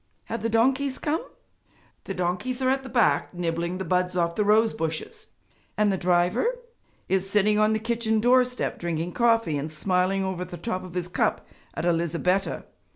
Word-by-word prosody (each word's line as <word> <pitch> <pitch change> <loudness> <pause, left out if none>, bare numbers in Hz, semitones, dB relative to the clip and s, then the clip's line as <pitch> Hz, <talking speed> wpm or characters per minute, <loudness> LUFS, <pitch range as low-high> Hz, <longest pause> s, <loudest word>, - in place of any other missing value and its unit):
Have 230 - -4
the 230 - -1
donkeys 260 +4 +2
come?' 315 +1 -1 0.8
'The 195 - -4
donkeys 185 +9 -2
are 260 0 +2
at 270 0 0
the 265 - -9
back 235 -2 +2
door 175 - -12
nibbling 170 +1 -1
the 190 - -4
buds 180 +1 0
off 170 -1 +1
the 210 - 0
rose 215 +2 +4
bushes.' 165 - -5 0.5
'And 210 -1 +3
the - - +1
driver?' 180 - +1 0.5
'Is 190 0 0
sitting 210 +1 +3
on 215 +1 +3
the - - +2
kitchen 225 0 0
doorstep 250 +2 +2
drinking 170 0 -2
coffee 230 -9 +2
and 150 +2 -5
smiling 185 +4 +1
over 190 -1 -3
the 180 -1 -8
top 185 +1 -3
of 180 -1 -10
his 180 -1 -1
cup 180 - 0 0.3
at - - -3
Elizabetta. 175 +3 0
195 Hz, 180 wpm, -25 LUFS, 175-230 Hz, 0.8 s, rose